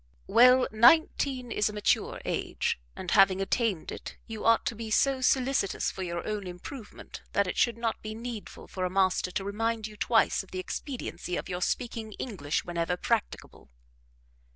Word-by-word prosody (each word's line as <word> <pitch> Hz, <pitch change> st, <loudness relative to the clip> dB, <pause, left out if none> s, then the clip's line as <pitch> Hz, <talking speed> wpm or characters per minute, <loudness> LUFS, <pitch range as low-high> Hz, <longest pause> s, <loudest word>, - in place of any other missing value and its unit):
"Well, 250 Hz, -, +6 dB
nineteen 250 Hz, +1 st, +4 dB
is 210 Hz, 0 st, +1 dB
a -, -, -7 dB
mature 210 Hz, -1 st, 0 dB
age, -, -, -1 dB, 0.2 s
and, 180 Hz, -, -5 dB
having 195 Hz, -2 st, +5 dB
attained 195 Hz, -3 st, 0 dB
it, -, -, -8 dB
you 220 Hz, -2 st, -7 dB
ought 230 Hz, 0 st, +4 dB
to 230 Hz, -, -1 dB
be 225 Hz, 0 st, -6 dB
so 265 Hz, +4 st, +2 dB
solicitous 255 Hz, -5 st, +1 dB
for -, -, -7 dB
your 170 Hz, -2 st, -4 dB
own 210 Hz, -3 st, -3 dB
improvement, 205 Hz, +6 st, -9 dB
that 200 Hz, -, +3 dB
it 180 Hz, -, -3 dB
should 235 Hz, -2 st, +2 dB
not 230 Hz, -1 st, -2 dB
be 215 Hz, 0 st, -6 dB
needful 230 Hz, -2 st, -7 dB
for 185 Hz, -, -5 dB
a 180 Hz, -, 0 dB
master 185 Hz, -1 st, +1 dB
to 195 Hz, -, -3 dB
remind 220 Hz, +2 st, -2 dB
you 215 Hz, 0 st, -8 dB
twice 225 Hz, +1 st, +2 dB
of 195 Hz, -, -15 dB
the 185 Hz, -, -6 dB
expediency 185 Hz, -3 st, -4 dB
of -, -, -5 dB
your 180 Hz, 0 st, -3 dB
speaking 225 Hz, +1 st, -2 dB
English 170 Hz, -, -3 dB
whenever 175 Hz, 0 st, -1 dB
practicable." 230 Hz, +2 st, -3 dB
215 Hz, 175 wpm, -28 LUFS, 185-235 Hz, 0.2 s, Well